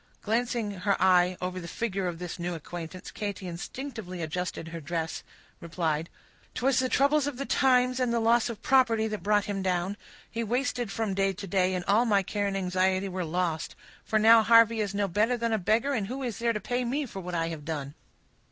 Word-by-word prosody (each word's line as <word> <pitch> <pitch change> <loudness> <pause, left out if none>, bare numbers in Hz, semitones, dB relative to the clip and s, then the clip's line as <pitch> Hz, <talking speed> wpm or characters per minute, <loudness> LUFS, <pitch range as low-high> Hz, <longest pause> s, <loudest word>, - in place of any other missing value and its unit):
Glancing 230 0 0
her 200 +1 -1
eye 180 -1 +4
over 185 0 -3
the 170 - -7
figure 195 -1 -2
of 175 -1 -4
this 175 0 -6
new 175 0 -2
acquaintance, 175 +3 -8
Katy 205 -3 -5
instinctively 185 0 -6
adjusting 165 +1 -3
her 165 0 -7
dress, 160 +2 -3 0.4
replied,— 165 -2 -2 0.5
"'Twas 265 +1 +2
the 255 0 +1
troubles 285 +2 +3
of 285 -4 -4
the 275 - -3
times, 255 -2 +3
and 250 -2 +1
the 235 - +1
loss 230 +1 +3
of 230 - -7
property, 240 -5 +3
that 215 -3 -4
brought 205 +2 +2
him 200 -1 -3
down; 185 +1 -1 0.3
he 230 0 -3
wasted 245 -1 -1
from 220 -2 -2
day 195 0 +1
to 200 +2 -7
day, 185 0 +1
and 180 -1 -3
all 215 +5 +3
my 200 -4 +3
care 205 +1 -2
and 195 0 -2
anxiety 185 +1 +1
were 185 0 -3
lost; 170 -1 -2 0.3
for 220 - 0
now 225 +1 +7
Harvey 230 0 +5
is 200 -1 -2
no 200 0 +1
better 215 +7 +1
than 230 -1 -1
a 220 - +1
beggar, 225 +9 +1
and 215 -7 -1
who 265 +4 -5
is 235 -5 -4
there 235 0 +2
to 215 - -2
pay 245 +4 -2
me 275 +5 -1
for 205 -6 -8
what 180 -1 -5
I 165 0 0
have 160 -3 -6
done?" 145 -3 -4
200 Hz, 215 wpm, -28 LUFS, 180-235 Hz, 0.5 s, now